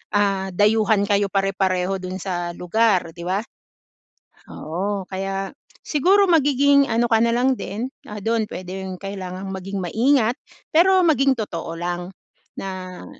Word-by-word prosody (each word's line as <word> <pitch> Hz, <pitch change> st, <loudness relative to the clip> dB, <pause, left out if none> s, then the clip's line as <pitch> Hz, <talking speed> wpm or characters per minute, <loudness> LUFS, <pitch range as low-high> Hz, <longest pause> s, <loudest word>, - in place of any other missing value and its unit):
ah, 195 Hz, -2 st, +1 dB
dayuhan 210 Hz, +2 st, +3 dB
kayo 200 Hz, -1 st, +1 dB
pare-pareho 195 Hz, -1 st, 0 dB
dun 185 Hz, 0 st, -5 dB
sa 175 Hz, -2 st, -3 dB
lugar 185 Hz, -1 st, +1 dB
'di 170 Hz, -, -8 dB
ba? 190 Hz, +2 st, +1 dB, 1.1 s
Oo, 195 Hz, +6 st, -3 dB
kaya 195 Hz, 0 st, -3 dB, 0.4 s
siguro 380 Hz, +7 st, +4 dB
magiging 285 Hz, -3 st, +4 dB
ano 235 Hz, +1 st, +2 dB
ka 225 Hz, -, +4 dB
nalang 240 Hz, +3 st, +2 dB
din, 225 Hz, +6 st, -4 dB, 0.2 s
ah, 210 Hz, 0 st, -6 dB
doon 225 Hz, +1 st, 0 dB
pwedeng 185 Hz, 0 st, -6 dB
kailangang 190 Hz, -1 st, -6 dB
maging 195 Hz, +1 st, -5 dB
maingat 235 Hz, -, +2 dB, 0.3 s
pero 370 Hz, +4 st, +5 dB
maging 275 Hz, -4 st, +4 dB
totoo 170 Hz, -6 st, -4 dB
lang 175 Hz, +1 st, -4 dB, 0.4 s
na 185 Hz, -1 st, -6 dB
195 Hz, 125 wpm, -22 LUFS, 185-235 Hz, 1.1 s, pero